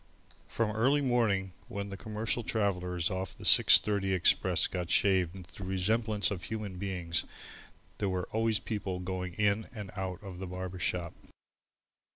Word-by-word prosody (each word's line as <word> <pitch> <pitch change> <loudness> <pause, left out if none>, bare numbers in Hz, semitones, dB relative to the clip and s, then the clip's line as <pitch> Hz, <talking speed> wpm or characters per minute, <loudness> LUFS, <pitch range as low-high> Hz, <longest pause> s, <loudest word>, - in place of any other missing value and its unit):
From 115 -2 -1
early 135 +6 +3
morning, 110 -8 +1
when 100 0 -5
the 100 - -6
commercial 110 +3 -2
travellers 90 -6 -1
off 95 +1 -4
the - - -11
6.30 100 -2 +5
express 90 - +3
got 90 -2 -3
shaved 95 -3 +3
into 90 -3 -11
the 95 - -8
resemblance 105 +3 +1
of 95 -2 -4
human 105 -4 -5
beings, 90 -4 -2 0.8
there 100 - 0
were 90 -1 -2
always 110 0 +1
people 100 -4 -3
going 90 -1 -4
in 105 +1 +1
and 105 -6 -7
out 95 -2 -3
of 95 -3 -8
the 95 - -5
barber 90 0 -6
shop. 90 -1 -1
95 Hz, 155 wpm, -31 LUFS, 90-105 Hz, 0.8 s, 6.30